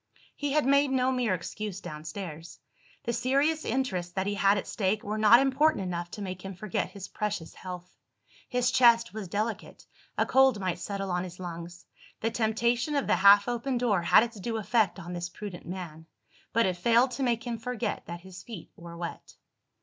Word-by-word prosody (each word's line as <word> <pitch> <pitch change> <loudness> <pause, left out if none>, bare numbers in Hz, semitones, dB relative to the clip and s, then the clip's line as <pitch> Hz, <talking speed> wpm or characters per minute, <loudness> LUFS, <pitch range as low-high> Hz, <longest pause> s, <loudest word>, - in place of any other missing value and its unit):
He 290 -1 -2
had 305 -2 +3
made 280 +1 +4
no 260 -1 +2
mere 245 -7 +1
excuse 195 +2 -5
downstairs. 160 0 -7 0.5
The 235 - -1
serious 280 +6 +1
interests 200 -9 -1
that 190 +1 -1
he 205 - -1
had 200 0 +3
at 200 - -3
stake, 205 +1 -1
were 210 +1 -3
not 220 +2 +8
important 275 -2 +2
enough 175 -1 -4
to 205 - -7
make 185 -1 -5
him 195 -1 -6
forget 195 0 -2
his 195 -2 -8
precious 210 -6 -4
health. 180 -1 -9 0.5
His 250 0 +1
chest 235 -3 +5
was 215 -3 -5
delicate; 215 +3 -4 0.3
a - - +3
cold 265 -4 +4
might 185 -3 -2
settle 195 -2 -4
on 180 0 0
his 180 0 -9
lungs. 175 -1 -7 0.4
The 225 - 0
temptation 235 +5 +1
of 280 - +1
the - - +2
half 200 +2 +7
open 245 +2 -1
door 225 -7 +2
had 170 - +6
its 230 -2 -6
due 225 +3 -3
effect 220 -2 +1
on 175 -1 -7
this 175 0 -4
prudent 190 -1 -8
man; 165 -3 -7 0.4
but 230 +1 +3
it 185 -2 0
failed 235 +7 +4
to 275 - -5
make 235 -2 0
him 235 -2 -3
forget 235 -2 -3
that 170 0 -6
his 190 0 -11
feet 220 -9 -10
were 170 0 -10
wet. 170 0 -7
210 Hz, 195 wpm, -28 LUFS, 180-240 Hz, 0.5 s, not